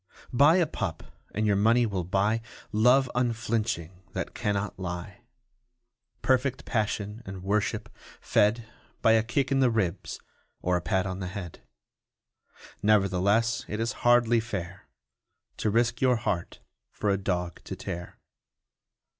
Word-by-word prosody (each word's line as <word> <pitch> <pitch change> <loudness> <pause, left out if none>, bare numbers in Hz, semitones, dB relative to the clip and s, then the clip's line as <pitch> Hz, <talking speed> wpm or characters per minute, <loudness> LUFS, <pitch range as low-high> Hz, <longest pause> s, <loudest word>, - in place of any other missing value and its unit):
Buy 145 +6 +6
a 180 -2 +4
pup 110 - -4 0.3
and 110 +2 -1
your 105 -1 +3
money 115 +4 +4
will 100 -5 -2
buy 100 +5 +1 0.3
Love 125 +5 +4
unflinching 110 -7 -1
that - - -4
cannot 100 -1 -2
lie 90 +1 -5 1.0
Perfect 130 +1 +1
passion 105 -1 -2
and 95 -3 -8
worship 100 +2 0 0.3
fed 110 +3 +2 0.4
By 115 - +6
a 110 0 +5
kick 130 +4 -1
in 135 - +3
the 130 -2 +5
ribs 100 -6 -2 0.4
or 90 0 0
a 90 - 0
pat 95 0 0
on 95 0 -4
the 95 - -4
head. 90 -3 -7 1.2
Nevertheless 105 +2 +2
it 105 - -4
is 115 +1 0
hardly 120 -1 +5
fair 100 -4 -6 0.7
To 110 - 0
risk 115 +2 +1
your 130 -1 +4
heart 90 -7 -3 0.3
for 105 - -1
a 100 - +2
dog 90 -3 -2
to - - -5
tear. 90 -2 -6
105 Hz, 140 wpm, -28 LUFS, 95-120 Hz, 1.2 s, Buy